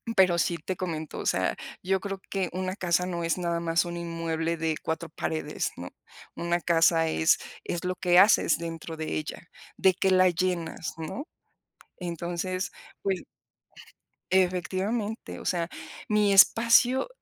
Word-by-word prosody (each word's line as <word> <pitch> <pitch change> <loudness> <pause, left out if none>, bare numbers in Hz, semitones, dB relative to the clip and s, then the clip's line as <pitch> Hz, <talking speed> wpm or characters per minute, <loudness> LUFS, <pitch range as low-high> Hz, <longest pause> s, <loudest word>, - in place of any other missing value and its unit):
pero 185 -3 +5
sí 170 0 +1
te 185 - -3
comento, 160 -4 -4
o - - -5
sea, - - +1 0.3
yo 190 +1 +1
creo 195 0 -5
que 190 -3 -1
una 185 +1 -2
casa 180 -2 +1
no 170 -2 -3
es 165 +2 0
nada 170 -1 -1
más 165 +1 +1
un 175 0 -5
inmueble 165 -1 -2
de 160 -1 -1
cuatro 160 0 -3
paredes, 155 -1 -3
¿no?, 90 +1 -7 0.5
una 170 0 0
casa 165 0 +3
es 160 0 +3 0.2
es 175 - -4
lo 185 0 -1
que 180 -1 +4
haces 195 -5 +5
dentro 165 -1 -6
de 160 - -3
ella, 155 +2 -6 0.3
de 190 -1 +4
qué 190 0 +1
la 185 0 +6
llenas, 175 -2 -2
¿no? 260 - -5 0.7
Entonces, 175 +1 -3 0.3
pues 190 -2 -1 1.1
Efectivamente, 190 +4 0
o - - -10
sea, 170 -2 0 0.4
mi 210 -1 +3
espacio 230 - +5
175 Hz, 150 wpm, -27 LUFS, 165-190 Hz, 1.1 s, la